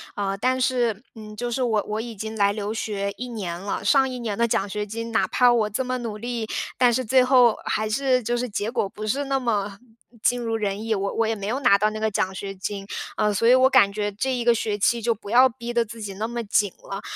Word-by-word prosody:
呃， 195 -1 -2
但 255 +5 +1
是 240 -5 +1
嗯， 215 -1 -10
就 240 +3 -3
是 255 +2 -1
我 220 -4 +1
我 215 +1 -2
已 230 0 -6
经 220 +2 -6
来 200 -1 +3
留 205 0 -4
学 205 -3 -3
1 250 0 -5
年 185 -7 -5
了， 195 +2 -4
上 270 -2 +4
1 255 -1 -5
年 220 -4 -3
的 235 - +2
奖 200 -2 0
学 210 +2 -3
金， 230 +2 -6
哪 - - +2
怕 250 -1 +4
我 225 -3 +2
这 225 +6 -2
么 255 0 -2
努 225 -3 -5
力， 235 0 -4 0.3
但 245 -1 +4
是 255 - 0
最 255 +2 +4
后 250 -3 +5
还 215 0 -1
是 255 +2 +2
就 240 +1 -1
是 250 +1 -2
结 210 -1 -3
果 235 -4 -1
不 215 +2 -7
是 280 +6 0
那 270 0 0
么 205 -5 -2 0.4
尽 245 +2 +2
如 230 -1 -2
人 205 -1 -2
意。 225 - +1
我 200 -1 -2
我 225 - +1
也 225 - 0
没 200 -2 -5
有 245 +5 -1
拿 245 - +6
到 210 +2 +2
那 215 0 -6
个 220 0 0
奖 190 -1 -1
学 195 0 -5
金， 195 +1 -5 0.3
呃， 210 -1 +2
所 215 +4 +1
以 250 - +7
我 260 0 +6
感 200 -6 +5
觉 205 0 -2
这 240 +7 -2
一 245 -2 -1
个 235 0 +5
学 215 -2 -2
期 230 +3 +2
就 230 +1 +1
不 205 -1 -10
要 255 +2 +6
逼 235 0 -7
得 235 0 +3
自 230 +1 -11
己 205 -2 -5
那 215 +3 -3
么 235 0 -4
紧 205 -2 +1
了。 195 +1 -6
220 Hz, 280 characters per minute, -24 LUFS, 205-240 Hz, 0.4 s, 以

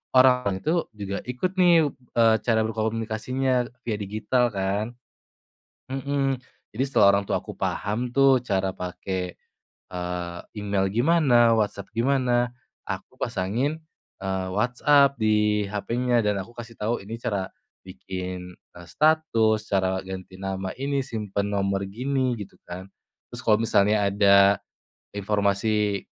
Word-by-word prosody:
orang 125 -7 +5
tu 165 +2 +1
juga 100 -1 -4
ikut 125 +9 -2
nih 170 -3 +6 0.3
eee, 115 -1 +6
cara 115 -2 +3
berkomunikasinya 115 +3 -1 0.2
via 110 -3 -1
digital 110 +5 0
kan. 100 +2 -1 1.1
Mhm, 135 -1 -1 0.3
jadi 125 - 0
setelah 105 -7 +5
orang 100 0 +2
tuaku - - -2
paham 115 +5 -2
tuh 135 -2 +5
cara 95 -4 0
pakai, 90 0 -5 0.6
eee, 90 -1 -4 0.2
email 100 -1 0
gimana, 120 -4 +4
WhatsApp 100 -2 -1
gimana, 125 -1 +2 0.3
aku - - -6
pasangin, 125 +12 -1 0.4
eee, 95 -1 -2
WhatsApp 140 +6 +3
di 105 -1 +2
HP-nya 120 +3 0
dan 105 -1 +1
aku 120 - -17
kasih 115 -1 -9
tahu 115 +3 -1
ini 110 +3 -6
cara 105 -5 -2 0.4
bikin, 90 -1 -6 0.2
eee, 85 - -10
status, 115 - +2
cara 95 -1 +1
ganti 95 0 -8
nama 95 0 -4
ini, 140 +1 -1
simpen 105 -5 -3
nomor 100 -1 0
gini, 130 +3 -1
gitu 100 - -9
kan, 90 +2 -6 0.5
terus - - -6
kalau 105 -1 +5
misalnya 105 -1 +3
ada 100 -1 +5 0.6
informasi 100 0 0
110 Hz, 125 wpm, -25 LUFS, 100-125 Hz, 1.1 s, nih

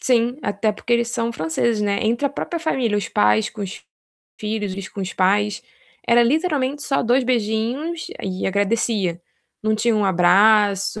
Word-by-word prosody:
sim, 245 -1 +1
até 205 +1 0
porque 235 +3 -4
eles 235 0 +2
são 235 0 -2
franceses, 210 +6 -1
né, 200 -1 0
entre 235 +6 +1
a - - +1
própria 340 +4 -4
família, 250 -10 0
os 205 - -2
pais 105 +1 +2
com 210 - -7
os 190 - -7 0.6
filhos 210 -2 -3
e 195 -1 -7
com 200 - -7
os 190 0 -4
pais, 205 +2 +1 0.4
era 235 0 +5
literalmente 290 0 0
só 275 - 0
2 250 +2 +2
beijinhos 245 +8 -1 0.2
e 190 -1 -3
agradecia, 200 -3 0 0.4
não 215 0 +1
tinha 225 +1 +1
um 210 - +1
abraço, 200 +3 +3
215 Hz, 170 wpm, -21 LUFS, 200-240 Hz, 0.6 s, era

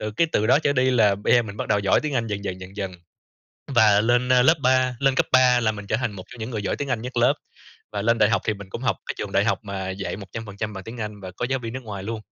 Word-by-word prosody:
Rồi 105 0 -4
cái 170 - +3
từ 105 - +2
đó 140 - +5
trở 145 -2 +1
đi 130 -1 +2
là 110 -5 +4
bây 105 - +2
giờ 120 - +5
mình 100 -2 -8
bắt 130 - -4
đầu 105 - +3
giỏi 100 -1 +3
tiếng 150 -2 -3
Anh 115 -2 0
dần 105 -2 -4
dần 95 -1 -4
dần 95 +2 -11
dần. 95 -2 -3 0.8
Và 105 -3 +6
lên, 120 +3 +2
ơ, 125 -1 +6
lớp 160 +5 +5
ba 130 -1 +2
lên 135 -1 +3
cấp - - +2
3 125 -1 +5
là 110 -1 +1
mình 105 -1 -8
trở 110 - 0
thành 120 -3 -2
một 95 -2 -9
trong 125 - -12
những 110 +3 -4
người 110 -4 -3
giỏi - - -1
tiếng 145 - -4
Anh 120 -4 -1
nhất 125 +1 -7
lớp, 120 - +4 0.6
và 100 - -2
lên 115 +2 +2
đại 105 - +5
học 110 - +1
thì 110 - +1
mình 100 -1 -11
cũng - - -6
học - - +1
cái - - -3
trường - - -5
đại - - +3
học - - +1
mà 95 -2 -4
dạy 95 0 -4
100% 105 +1 -6
bằng 95 -2 -8
tiếng 115 +3 -8
Anh 105 -1 -5
và 95 -1 -7
có 120 - -2
giáo 135 - +1
viên 115 -2 -6
nước 130 +1 -6
ngoài 100 -3 -6
luôn. 110 +1 -4
110 Hz, 315 wpm, -24 LUFS, 100-125 Hz, 0.8 s, Và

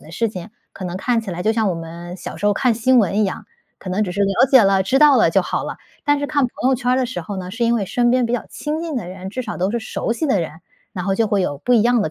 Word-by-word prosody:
的 155 - -14
事 225 +6 -1
情， 190 0 -8 0.2
可 190 - -8
能 175 +1 -4
看 235 +3 0
起 210 -4 -7
来 180 +1 -4
就 220 - +2
像 220 -3 +1
我 - - -1
们 170 +2 -8
小 - - -8
时 205 - -2
候 205 - +4
看 250 +1 +2
新 250 +2 +3
闻 205 -1 +2
一 - - +3
样， 190 - -4 0.3
可 190 - -9
能 195 +4 0
只 180 - -4
是 200 - -3
了 195 +6 +3
解 260 -3 +8
了、 195 -1 +3
知 260 +8 +1
道 295 -2 +7
了 - - +4
就 - - +3
好 - - -2
了。 - - -6 0.3
但 290 0 +3
是 285 - -1
看 285 -2 +1
朋 250 +1 -2
友 265 - +3
圈 250 0 -1
儿 - - +3
的 255 - +1
时 180 -9 -5
候 195 +3 -6
呢， 180 -1 -6
是 235 +4 -2
因 235 +1 +3
为 205 -4 -1
身 240 +3 +1
边 255 -1 +2
比 235 - -3
较 245 - -3
亲 305 +2 -4
近 325 -3 -4
的 215 -8 -3
人， 190 +1 -7
至 255 - -4
少 220 -4 -5
都 185 +3 0
是 235 - -1
熟 225 - -3
悉 310 +7 -2
的 260 -8 +2
人， 165 -1 -5 0.3
然 180 -4 -4
后 195 - +1
就 225 +2 +1
会 205 -2 +1
有 145 -5 -1
不 245 - -1
一 230 - +6
样 240 -1 +3
的 155 - -2
215 Hz, 355 characters per minute, -20 LUFS, 185-245 Hz, 0.3 s, 解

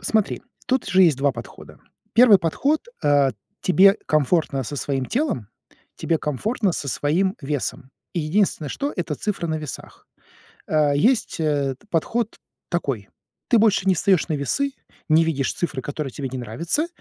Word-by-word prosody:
Смотри, 220 -2 0 0.2
тут 260 +1 0
же 190 +1 +4
есть 160 -7 +5
2 140 0 +2
подхода. 120 -1 -11 0.3
Первый 225 -3 +7
подход: 275 - 0 0.2
а, 145 -2 +4 0.3
тебе 195 +3 +5
комфортно 150 -2 +1
со 145 +5 -6
своим 135 -2 -2
телом, 240 - -1 0.5
тебе 165 -2 0
комфортно 195 - -1
со 140 - -4
своим 170 - 0
весом. 135 -2 -4 0.2
Единственное, 165 -1 0
что- 285 - -3
это 170 -4 -2
цифры 180 0 -3
на 160 - 0
весах. 150 -3 -9 0.6
Э, 150 -2 +3
есть, 225 - +2
э, 145 -3 0 0.2
подход 220 +7 -1 0.3
такой: 135 - -2 0.4
ты 235 - +5
больше 205 -3 +3
не 190 - +5
встаешь 180 0 +2
на 155 - 0
весы, 270 - -1 0.4
не 160 +1 +5
видишь 140 -5 0
цифры, 150 -7 -3
которые 145 -2 -4
тебе 135 -2 -4
не 130 - -5
нравятся, 165 - -2
160 Hz, 150 wpm, -23 LUFS, 140-200 Hz, 0.6 s, Первый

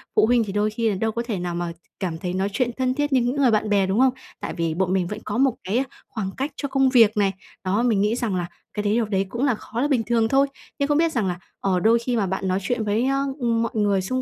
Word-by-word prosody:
Phụ - - +5
huynh 235 0 +3
thì 200 - -5
đôi 210 +1 +1
khi 225 +1 0
là 200 - 0
đâu 220 +3 0
có 235 - -2
thể 215 -6 -2
nào 175 -1 -3
mà 175 -1 -2 0.3
cảm 175 -4 -2
thấy 180 +1 -4
nói 190 +2 0
chuyện 245 -1 +1
thân 255 -1 +1
thiết 290 +1 -1
như 255 - +4
những 245 +3 0
người 270 -4 +3
bạn 215 0 +1
bè, 200 -2 +3
đúng 195 +5 +1
không? 260 -1 +5 0.3
Tại - - -4
vì 165 -2 -1
bọn 185 +1 0
mình 180 -2 +1
vẫn 210 - -5
có 210 +2 -2
một 265 -2 +3
cái 225 +8 +1 0.2
khoảng 200 -4 -4
cách 280 +3 -2
cho 280 - -3
công 270 -1 +3
việc 225 -4 +5
này. 195 -1 +2 0.3
Đó. 200 +5 +1
Mình 220 -5 +2
nghĩ 210 +3 +2
rằng 230 -6 -1
là 175 -1 -2 0.3
cái 210 - -2
đấy 205 +1 +1
điều 230 -1 +2
đấy 195 -2 0
cũng 240 +5 -3
là 250 -5 +2
khó 225 +3 -5
là 290 - +2
bình 255 -6 +1
thường 230 -1 +2
thôi. 275 +3 +3 0.3
Nhưng 280 - +1
không 295 - +2
biết 330 0 +3
rằng 220 -8 0
là, 180 0 -3 0.2
ờ, 185 -2 +1
đôi 230 +4 +4
khi 240 +1 -2
mà 205 - +1
bạn 190 +1 -2
nói 185 +1 +1
chuyện 230 +2 -1
với, 215 +4 +1
a, 275 0 +1 0.2
ừm, 230 -2 +1
mọi 230 - -2
người 205 -3 +2
xung 255 +7 -2
220 Hz, 305 wpm, -23 LUFS, 195-250 Hz, 0.3 s, Phụ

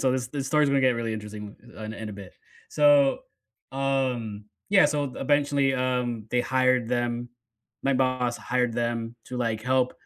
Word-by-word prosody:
so 130 - +2
this 125 -1 -2
this 140 0 -4
story 150 +2 +3
is 140 - +1
gonna 140 - +3
get 130 -1 +4
really 115 -1 -2
interesting, 105 -1 -7 0.2
uh, 110 - -8
in 110 0 -6
a - - -6
bit. 100 -2 -11 0.4
So, 145 -2 +4 0.5
um, 130 -6 -1 0.3
yeah, 195 -6 +6
so, 145 -1 0
eventually, 140 -1 +2
um, 125 -3 -1
they 125 - +2
hired 130 -2 +2
them 120 0 -1 0.6
my 135 - +3
boss 130 -2 +1
hired 125 -1 0
them 115 0 -2
to, 125 - -7
like, 115 -3 -1
help 125 +1 +1
125 Hz, 175 wpm, -26 LUFS, 115-135 Hz, 0.6 s, yeah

